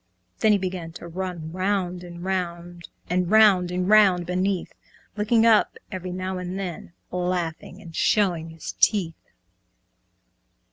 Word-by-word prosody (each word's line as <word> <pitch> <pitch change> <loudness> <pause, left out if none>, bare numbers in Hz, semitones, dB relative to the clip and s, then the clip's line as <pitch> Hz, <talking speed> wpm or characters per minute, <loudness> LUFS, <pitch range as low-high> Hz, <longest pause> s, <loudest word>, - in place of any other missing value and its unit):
Then 220 - +4
he 205 - +5
began 180 -3 -4
to 170 - -9
run 175 -2 -5
round 185 -1 -1
and 175 -1 -9
round, 175 -2 -4 0.2
And 180 0 0
round 205 -4 +5
and 180 +1 -2
round 195 -4 +5
beneath, 185 +1 -1 0.4
Looking 225 +2 +2
up 225 -2 +4
every 185 -2 -5
now 185 +1 -4
and 180 +1 -5
then, 180 -3 -6 0.2
Laughing 180 0 -3
and 165 -3 -11
showing 175 -6 +1
his 160 -1 -7
teeth. 185 -7 +3
180 Hz, 135 wpm, -24 LUFS, 175-195 Hz, 0.4 s, he